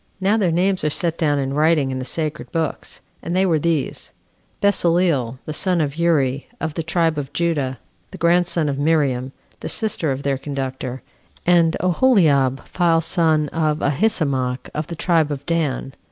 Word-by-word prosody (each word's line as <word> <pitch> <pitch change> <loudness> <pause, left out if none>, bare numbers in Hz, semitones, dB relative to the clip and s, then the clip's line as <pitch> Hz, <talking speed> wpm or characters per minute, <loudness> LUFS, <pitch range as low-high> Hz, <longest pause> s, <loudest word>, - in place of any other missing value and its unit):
Now 195 +3 +2
their 195 -6 +1
names 185 +2 +1
are 150 - +2
set 165 +2 0
down 145 -3 +2
in 135 -1 -2
writing 150 -2 +2
in 130 - -3
the 130 - -5
sacred 155 +1 -3
books; 165 -2 -4 0.2
and 170 - -3
they 190 +1 +3
were 165 -4 +2
these: 160 -3 -2 0.5
Besaleel, 170 - +2
the 155 - -4
son 180 +2 +1
of 145 -3 -1
Uri, 145 -5 +1
of 160 -1 -3
the 165 - -3
tribe 165 -1 0
of 140 - -6
Judah, 150 -7 -1 0.3
the - - -10
grandson 170 -1 +2
of 140 -1 -2
Miriam, 140 -4 +1 0.3
the - - -5
sister 200 -9 0
of 135 +1 -4
their 140 -2 -1
conductor 135 -2 -5 0.4
and 170 -2 +4
Aholiab, 165 - +3
the 170 -2 +3
son 160 -2 +2
of 155 -1 0
Ahisamach, 140 - 0
of 150 0 -3
the 170 - -6
tribe 165 -2 +1
of 140 -2 -5
Dan. 150 -5 -1
155 Hz, 170 wpm, -21 LUFS, 140-170 Hz, 0.5 s, and